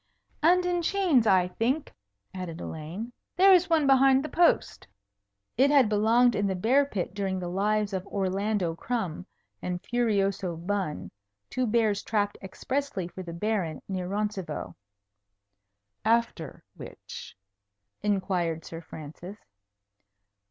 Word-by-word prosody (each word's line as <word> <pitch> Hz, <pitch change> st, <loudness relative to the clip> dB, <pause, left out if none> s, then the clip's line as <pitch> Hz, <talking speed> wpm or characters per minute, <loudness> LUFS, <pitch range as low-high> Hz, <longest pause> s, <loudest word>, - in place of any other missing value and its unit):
"And 355 Hz, +3 st, +4 dB
in 355 Hz, -1 st, +1 dB
chains, 335 Hz, -, +2 dB
I 185 Hz, -3 st, +4 dB
think," 245 Hz, +11 st, -1 dB, 0.4 s
added 180 Hz, -3 st, -6 dB
Elaine. 175 Hz, +10 st, -6 dB, 0.2 s
"There 385 Hz, +2 st, +7 dB
is 365 Hz, 0 st, +4 dB
one 320 Hz, -3 st, +3 dB
behind 270 Hz, 0 st, +5 dB
the -, -, -5 dB
post." 345 Hz, 0 st, +2 dB, 0.7 s
It 270 Hz, +3 st, +5 dB
had 275 Hz, -6 st, +5 dB
belonged 230 Hz, +4 st, +4 dB
in 205 Hz, -1 st, 0 dB
the 190 Hz, -, -1 dB
bear 255 Hz, +9 st, +3 dB
pit 190 Hz, -8 st, -3 dB
during 195 Hz, -1 st, -2 dB
the 180 Hz, -1 st, -4 dB
lives 205 Hz, +3 st, 0 dB
of 190 Hz, +1 st, -3 dB
Orlando 195 Hz, -2 st, -1 dB
Crumb 190 Hz, -3 st, -3 dB, 0.3 s
and 180 Hz, -1 st, -3 dB
Furioso 200 Hz, -7 st, 0 dB
Bun, 180 Hz, -2 st, -3 dB, 0.4 s
two 255 Hz, -1 st, 0 dB
bears 215 Hz, -2 st, +2 dB
trapped 205 Hz, -2 st, -1 dB
expressly 230 Hz, -1 st, -3 dB
for 185 Hz, -, -8 dB
the 175 Hz, -2 st, -7 dB
Baron 170 Hz, -4 st, -2 dB
near 185 Hz, -2 st, -3 dB
Roncevaux. 200 Hz, -5 st, -3 dB, 1.3 s
"After 225 Hz, -8 st, 0 dB
which?" 100 Hz, -, -10 dB, 0.6 s
inquired 185 Hz, -5 st, -1 dB
Sir 165 Hz, 0 st, -7 dB
Francis. 160 Hz, +5 st, -10 dB
205 Hz, 125 wpm, -27 LUFS, 180-245 Hz, 1.3 s, There